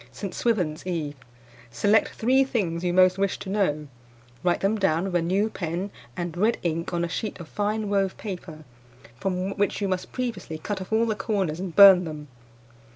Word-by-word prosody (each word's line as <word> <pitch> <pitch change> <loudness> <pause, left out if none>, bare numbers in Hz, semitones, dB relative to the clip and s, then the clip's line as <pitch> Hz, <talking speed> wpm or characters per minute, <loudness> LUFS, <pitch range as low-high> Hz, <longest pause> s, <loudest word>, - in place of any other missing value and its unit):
"St. 180 +9 -6
Swithin's 180 -9 -1
Eve. 160 -5 -2 0.6
Select 205 - +3
three 260 +4 +3
things 180 -10 -2
you 175 - +1
most 185 +1 +4
wish 195 -1 0
to 190 - -7
know; 155 -8 0 0.6
write 175 -1 +1
them 200 +3 +2
down 170 -4 +2
with 195 -1 -3
a 175 - +3
new 190 +5 +1
pen 180 0 -4 0.3
and 175 -2 -3
red 215 +6 +2
ink 165 0 -2
on 170 -1 0
a - - -3
sheet 210 +5 -4
of 170 - -8
fine 210 +2 -2
wove 195 -2 0
paper, 175 -6 -7 0.6
from 190 +3 -2
which 205 0 0
you 200 - -1
must 185 -1 -3
previously 235 -10 -4
cut 190 +4 -4
off 185 - -8
all 220 +1 +3
the 225 - 0
corners 195 -6 -2
and 185 -3 -5
burn 195 -3 +9
them. 150 -2 -7
185 Hz, 190 wpm, -25 LUFS, 170-205 Hz, 0.6 s, burn